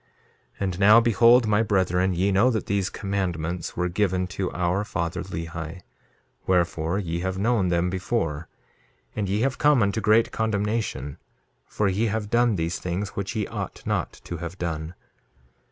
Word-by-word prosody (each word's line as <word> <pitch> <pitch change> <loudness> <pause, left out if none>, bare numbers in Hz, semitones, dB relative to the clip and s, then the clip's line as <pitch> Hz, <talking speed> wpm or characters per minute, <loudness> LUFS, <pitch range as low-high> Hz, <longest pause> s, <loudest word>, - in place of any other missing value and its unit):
2:34 - - -21
And 95 -2 -2
now 105 +3 +8
behold, 115 +1 +5
my 105 +1 +3
brethren, 95 -3 +1
ye 95 +3 +1
know 100 +6 +4
that 110 -4 -1
these 100 -1 0
commandments 90 -4 -3
were 90 0 +1
given 95 0 0
to 95 -1 -3
our 90 +3 0
father, 85 -5 -3
Lehi; 85 +1 -6 0.7
wherefore, 85 -1 +1
ye 85 -4 -2
have 95 +1 -2
known 105 -1 +1
them 85 0 +1
before; 85 -5 -2 0.7
and 100 -3 -2
ye 105 +3 0
have 135 +1 0
come 145 -6 +4
unto 100 +2 0
great 110 +2 +3
condemnation; 105 - -2 0.5
for 105 - 0
ye 100 +4 +1
have 105 0 -3
done 120 -2 +3
these 80 -2 -2
things 90 +3 -3
which 100 -1 -5
ye 105 -2 0
ought - - -6
not - - -1
to 85 - -6
have 85 +2 -6
done. 80 -1 -4
95 Hz, 165 wpm, -25 LUFS, 85-105 Hz, 0.7 s, now